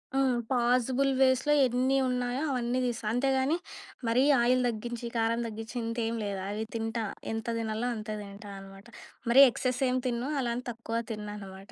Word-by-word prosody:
ఆ! -, -, +3 dB, 0.3 s
పాజిబుల్ 250 Hz, +2 st, +2 dB
వేస్‌లో 265 Hz, +2 st, +4 dB
ఎన్ని 255 Hz, +2 st, +2 dB
ఉన్నాయో, 250 Hz, +1 st, -1 dB
అవన్నీ 250 Hz, -1 st, 0 dB
తీస్తా. 240 Hz, -2 st, -3 dB
అంతేగాని 265 Hz, +4 st, +2 dB, 0.5 s
మరీ 240 Hz, +3 st, +3 dB, 0.2 s
ఆయిల్ 250 Hz, +1 st, +3 dB
తగ్గించి, 235 Hz, +1 st, -4 dB
కారం 230 Hz, +1 st, +1 dB
తగ్గించి 225 Hz, +2 st, -7 dB
ఇంతేం 230 Hz, 0 st, -2 dB
లేదు. 200 Hz, -1 st, -3 dB
అవి 210 Hz, +2 st, -2 dB
తింటా. 225 Hz, 0 st, -2 dB, 0.3 s
ఎంత 225 Hz, +1 st, -4 dB
తినాల్నో 225 Hz, +2 st, -2 dB
అంతే 215 Hz, 0 st, -5 dB
తింటా 200 Hz, +1 st, -10 dB
అనమాట. 195 Hz, +1 st, -13 dB, 0.4 s
మరి 265 Hz, +4 st, +9 dB
ఎక్సెస్ 250 Hz, +2 st, -2 dB
ఏమి 255 Hz, 0 st, 0 dB
తినను. 245 Hz, +2 st, -2 dB
అలా 240 Hz, -2 st, -1 dB
అని 250 Hz, -, -5 dB
తక్కువ 230 Hz, 0 st, -3 dB
తిన్నానమాట. 205 Hz, -2 st, -7 dB
235 Hz, 155 wpm, -29 LUFS, 220-255 Hz, 0.5 s, మరి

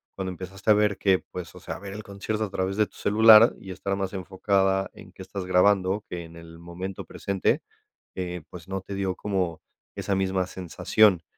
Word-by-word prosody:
cuando 95 Hz, -1 st, -3 dB
empezaste 95 Hz, +3 st, -6 dB
a -, -, +9 dB
ver 105 Hz, -1 st, +2 dB
que, 95 Hz, -2 st, +3 dB
pues, 90 Hz, -4 st, -9 dB
o -, -, -10 dB
sea, -, -, -6 dB
a -, -, -9 dB
ver 100 Hz, 0 st, -8 dB
el 105 Hz, +1 st, -7 dB
concierto 105 Hz, +2 st, -3 dB
a 105 Hz, -, -3 dB
través 95 Hz, 0 st, -1 dB
de 105 Hz, -, +4 dB
tu -, -, -21 dB
celular 110 Hz, +2 st, +7 dB
y 95 Hz, -, -9 dB
estar 100 Hz, +1 st, -2 dB
más 95 Hz, -1 st, -2 dB
enfocada 95 Hz, +1 st, +1 dB
en -, -, -14 dB
qué -, -, -12 dB
estás 95 Hz, 0 st, -6 dB
grabando 95 Hz, +2 st, +3 dB
que 85 Hz, -1 st, -5 dB
en 85 Hz, 0 st, -14 dB
el 85 Hz, 0 st, -12 dB
momento 90 Hz, +3 st, -6 dB
presente, 100 Hz, -2 st, 0 dB, 0.5 s
eh, 90 Hz, -2 st, -4 dB
pues, 90 Hz, -1 st, -11 dB
no 95 Hz, 0 st, -3 dB
te 100 Hz, -, -8 dB
dio 95 Hz, -1 st, -1 dB
como 95 Hz, -5 st, -2 dB, 0.3 s
esa 100 Hz, -, -2 dB
misma 95 Hz, -1 st, 0 dB
sensación. 95 Hz, +1 st, +2 dB
95 Hz, 205 wpm, -26 LUFS, 90-100 Hz, 0.5 s, a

